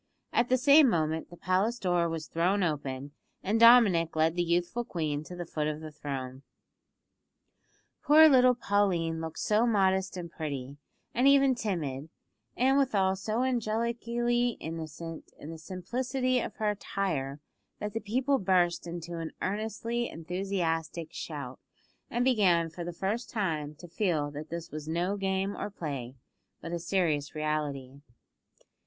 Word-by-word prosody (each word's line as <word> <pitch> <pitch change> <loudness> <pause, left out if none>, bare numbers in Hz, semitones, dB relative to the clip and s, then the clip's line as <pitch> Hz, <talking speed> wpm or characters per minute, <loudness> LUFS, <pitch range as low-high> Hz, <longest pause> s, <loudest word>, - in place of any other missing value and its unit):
At 240 +1 +2
the 255 - +4
same 285 +2 +7
moment 160 -3 -1
the 175 - -12
palace 190 +7 +1
door 175 -4 +1
was 165 -1 -4
thrown 185 +5 +1
open, 145 -4 -3 0.3
and 215 +4 +1
Dominick 220 -9 +6
led 160 +1 +3
the 175 - +1
youthful 175 +7 0
queen 155 -9 -3
to 180 - -8
the 175 0 -5
foot 150 -2 -2
of 155 0 -3
the 155 -1 -8
throne. 135 -3 -6 1.6
Poor 315 +2 +8
little 255 -3 +6
Pauline 180 -7 0
looked 160 0 -6
so 215 +3 +2
modest 190 -3 +2
and 170 -2 -6
pretty, 140 -4 -5 0.4
and 250 +3 +3
even 275 -1 +6
timid, 160 - -3 0.5
and 265 +3 +4
withal 195 -8 +2
so 215 +5 -1
angelically 235 0 0
innocent 165 0 -7
in 155 - -9
the 165 - -8
simplicity 250 - -1
of - - -5
her 215 -2 0
attire, 165 -9 -3 0.4
that 210 -1 -5
the 225 - -1
people 260 +6 +1
burst 175 -3 +2
into 170 0 -6
an 165 -1 -5
earnestly 220 +4 -2
enthusiastic 165 -2 -3
shout, 140 -5 -6 0.5
and 240 +1 0
began 180 -10 +3
for 175 +2 -6
the 175 - -4
first 195 +7 -3
time 155 -9 -2
to 175 - -12
feel 165 -5 -1
that 150 +2 -7
this 170 0 -6
was 155 0 -7
no 175 +5 0
game 195 0 -1
or 205 - -4
play, 140 -9 -5 0.4
but 165 - -7
a 170 - -1
serious 160 -5 0
reality. 145 -3 -3
175 Hz, 150 wpm, -29 LUFS, 160-220 Hz, 1.6 s, Poor